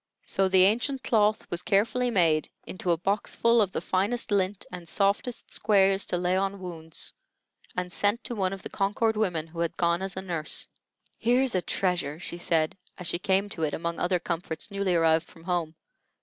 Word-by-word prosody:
So 195 - +1
the 185 -1 +5
ancient 245 +6 +1
cloth 215 -1 +2
was 175 0 -1
carefully 225 +4 +2
made 165 -8 +3 0.2
into 185 -1 -4
a 170 - +4
boxful 210 +5 +2
of 195 -3 +1
the - - -3
finest 205 +5 0
lint 195 0 +1
and 175 -2 -8
softest 200 +4 0
squares 195 -2 +3
to 180 - 0
lay 180 +1 +1
on 195 +1 -1
wounds, 165 -3 -6 0.6
and 180 0 -3
sent 205 +4 +1
to - - -4
one 190 -4 0
of 195 -1 -7
the - - -6
Concord 210 +3 0
women 180 -7 0
who 165 +1 -10
had 170 0 -1
gone 170 +1 +2
as 190 -1 -3
a 190 - -3
nurse. 165 -5 -2 0.5
"Here's 250 +2 +2
a 185 - +2
treasure!" 175 -6 -1
she 175 0 -4
said, 165 +1 0 0.2
as 180 - -6
she 170 - 0
came 195 +1 +2
to 175 - -4
it 155 -2 0
among 170 +1 -3
other 180 +1 +2
comforts 170 +1 -4
newly 200 -2 0
arrived 165 0 +3
from 165 - -17
home. 170 -3 -1
185 Hz, 190 wpm, -27 LUFS, 170-205 Hz, 0.6 s, the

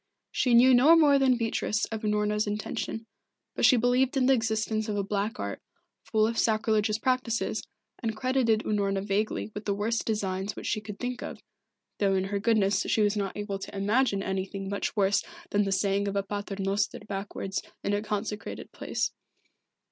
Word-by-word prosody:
She 245 -2 +2
knew 255 +2 +7
no 275 +7 +7
more 290 -4 +5
than 260 -2 +4
Beatrice 225 -1 0
of 220 -1 -3
Unorna's 210 0 0
intention, 210 +2 -3 0.5
but - - +2
she 255 - +6
believed 245 +3 +2
in 260 - +3
the 270 - +5
existence 220 -2 0
of 205 - -1
a 200 - 0
Black 205 +2 -2
Art, 100 0 -4 0.4
full 215 -1 +1
of 230 +1 -1
sacrilegious 215 -1 +2
practices, 250 -1 0 0.4
and 225 -3 -2
credited 255 -3 +2
Unorna 200 -2 0
vaguely 210 +2 -1
with 210 - -7
the 200 - 0
worst 220 +3 -1
designs 200 -2 -2
which - - -8
she 215 - -1
could 210 -1 -8
think 245 +1 -4
of, - - -6 0.6
though 195 -2 +2
in 190 - +1
her 200 +1 -2
goodness 205 -3 +2
she 215 - +3
was 205 +1 +2
not 200 -1 -2
able 205 -1 -3
to 195 - -7
imagine 205 0 +1
anything 195 0 -3
much 200 - -2
worse 200 -1 +2 0.3
than 205 0 +2
the 195 - -1
saying 200 +1 +1
of 200 - -2
a 200 - +1
Pater 205 0 -4
Noster 195 +1 0
backwards 195 -1 -4 0.2
in 200 - 0
a 205 - +1
consecrated 210 -1 -4
place. - - -2
210 Hz, 185 wpm, -28 LUFS, 200-230 Hz, 0.6 s, knew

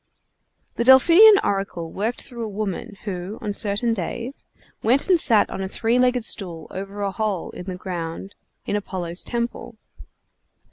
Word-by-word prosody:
The - - +1
Delphian 340 - +8
oracle 195 -4 -2
worked 220 +5 -2
through 240 -3 -7
a - - -3
woman, 205 -1 -5
who, 190 0 -5
on 210 -2 -4
certain 210 +3 +1
days, 230 +7 -5 0.4
went 255 +5 +2
and 365 -3 +4
sat 225 -6 +4
on - - -4
a 190 - -2
three 230 +5 0
legged 250 -2 +3
stool 170 -8 -1
over 200 +2 -6
a 200 - -1
hole 205 -3 -3
in 180 - -9
the 185 -1 -5
ground 180 0 -6 0.3
in - - -2
Apollo's 185 -4 -4
temple. 235 0 -4
205 Hz, 155 wpm, -22 LUFS, 190-235 Hz, 0.4 s, Delphian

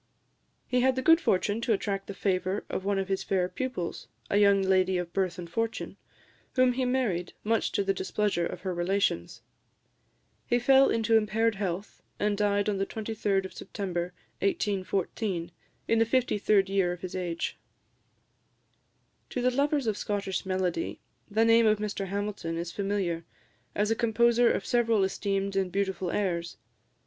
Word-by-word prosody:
He 250 - +1
had 260 0 +3
the 260 - -2
good 325 +4 +6
fortune 205 +4 +1
to 235 -1 +2
attract 195 -1 -2
the 200 - -6
favour 190 0 -1
of - - -2
one 200 0 0
of 195 -1 -1
his 195 -1 -1
fair 185 -2 0
pupils 250 -6 -4 0.2
a 200 - +3
young 200 -1 +5
lady 190 -1 +3
of 175 -1 -4
birth 185 -3 0
and 175 -1 -6
fortune 225 +6 -3 0.6
whom 255 -1 +4
he 260 +1 0
married, 230 -9 0
much 225 +1 +1
to 200 - +1
the 195 0 +1
displeasure 190 -2 0
of 175 - -7
her 185 -1 -2
relations. 175 - -1 1.0
He 240 - +3
fell 270 +2 +5
into 225 0 +2
impaired 220 +1 +2
health, 195 -1 -4 0.2
and 205 0 +1
died 205 0 +1
on 200 -2 0
the 195 - +1
23d 210 -3 -1
of 190 - -8
September 180 -3 -4 0.3
1814, 195 - -1 0.4
in 225 - +3
the 225 - +4
fifty 245 -2 +1
third 200 -1 +3
year 195 -2 +1
of 175 - -10
his 185 0 -6
age. 175 -2 -3 1.7
To - - -3
the 250 +1 +2
lovers 285 +1 +1
of 215 -2 0
Scottish 195 -2 -2
melody 185 - -1 0.3
the 220 +2 +3
name 230 0 +5
of 215 0 +4
Mr 205 -2 -3
Hamilton 200 -4 -3
is 170 0 -4
familiar, 195 -4 -1 0.5
as 210 +1 +1
a - - +3
composer 235 +1 +3
of - - -2
several 230 -4 +2
esteemed 195 0 -1
and 190 -2 0
beautiful 190 -1 -1
airs. 170 -3 -2
200 Hz, 165 wpm, -28 LUFS, 185-225 Hz, 1.7 s, good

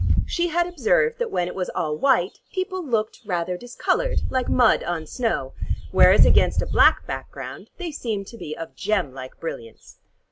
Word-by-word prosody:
She 345 0 0
had 345 +1 +1
observed 465 - +1
that 480 -1 -1
when 175 - -1
it 180 - -5
was 185 -1 -3
all 150 -2 -1
white, 230 - +2
people 375 -1 -3
looked 225 -7 -1
rather 180 -3 -2
discolored, 245 - -1
like 260 -1 0
mud 245 -3 +4
on 170 -2 -3
snow, 190 - -2 0.4
whereas - - +7
against - - +4
a - - 0
black - - +4
background - - -7
they 355 -3 -5
seemed 220 -9 -3
to 230 - -11
be 155 -8 -6
of 165 - -8
gem 200 -10 -1
like 130 -1 -9
brilliance. 115 -9 -8
225 Hz, 175 wpm, -23 LUFS, -, 0.4 s, whereas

